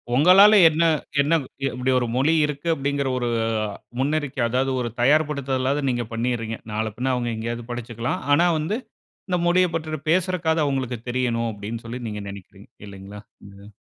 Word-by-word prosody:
ஒங்களால 185 +8 +7 0.2
என்ன 160 +2 0 0.4
என்ன, 150 +4 +1 0.3
இப்டி 130 0 -1
ஒரு 120 - -2
மொழி 140 +5 +3
இருக்கு 150 +2 -5
அப்படிங்குற, 140 0 -1
ஒரு 120 -1 -1 0.7
முன்னறிக்கை, 145 -1 -1
அதாவது 130 +2 0
ஒரு 120 - -2
தயார்படுத்துதலாவது 140 -1 +1
நீங்க 120 -1 -1
பண்ணியிர்றீங்க. 115 -1 -2
நாள 110 +1 -1
பின்ன 130 +1 0
அவுங்க 120 -1 -2
எங்கேயாவது 115 +1 -4
படிச்சுக்கலாம். 120 +7 -4
ஆனா 170 +4 +4
வந்து, 190 +9 -2 0.5
இந்த 180 -1 +1
மொழியப் 180 -1 +3
பற்றி 155 -2 -3
பேசுறக்காவது 170 -3 +1
அவுங்களுக்கு 130 -4 -2
தெரியணும் 120 -2 0
அப்டின்னு 110 +3 -7
சொல்லி 120 +2 -6
நீங்க 105 -1 -5
நெனைக்கிறீங்க. 100 +1 -12 0.2
இல்லைங்களா 100 +1 -10 0.3
இதில? 100 +1 -14
130 Hz, 150 wpm, -23 LUFS, 115-155 Hz, 0.7 s, ஒங்களால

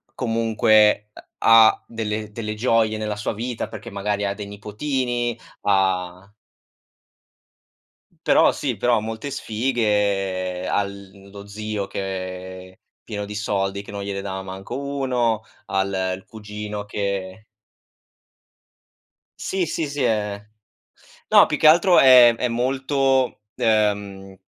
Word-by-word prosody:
comunque, 110 -2 +3
uh, - - -11 0.2
ha 115 -1 +6
delle 110 -2 -4
delle 110 -1 -4
gioie 110 -1 +1
nella 105 -1 -3
sua 105 - -3
vita, 115 +2 -4
perché 110 +1 -9
magari 100 +1 -2
ha 100 - -1
dei 100 0 -7
nipotini, 120 +3 -2 0.2
ha 95 -1 0 2.0
Però - - +5
sì, 130 -6 -3
però 120 +3 +2
ha - - -2
molte 110 +6 -5
sfighe, 100 -6 -1
ha 100 - +1
l 100 0 -11
lo 100 0 -11
zio 105 -1 -4
che 95 -1 -6
è - - -26 0.2
pieno 105 -1 -5
di 105 +1 -8
soldi, 100 -2 -2
che - - -12
non 100 -1 -5
gliele 100 -1 -4
dava 95 -1 -5
manco 95 +5 -7
1, 130 -5 -1 0.2
ha 95 0 0
l 100 0 -4 0.2
il 95 - -11
cugino 105 -1 -7
che 100 -1 -4 1.9
Sì, 190 -2 -2
sì, 160 0 -2
sì 140 0 -3
è 105 -4 0 0.9
no, - - +7
più - - -2
che - - +4
altro 170 +3 +6
è 125 -3 +8
è 125 - -1
molto, 130 +1 0
uhm, 100 -3 0
105 Hz, 130 wpm, -22 LUFS, 100-115 Hz, 2.0 s, è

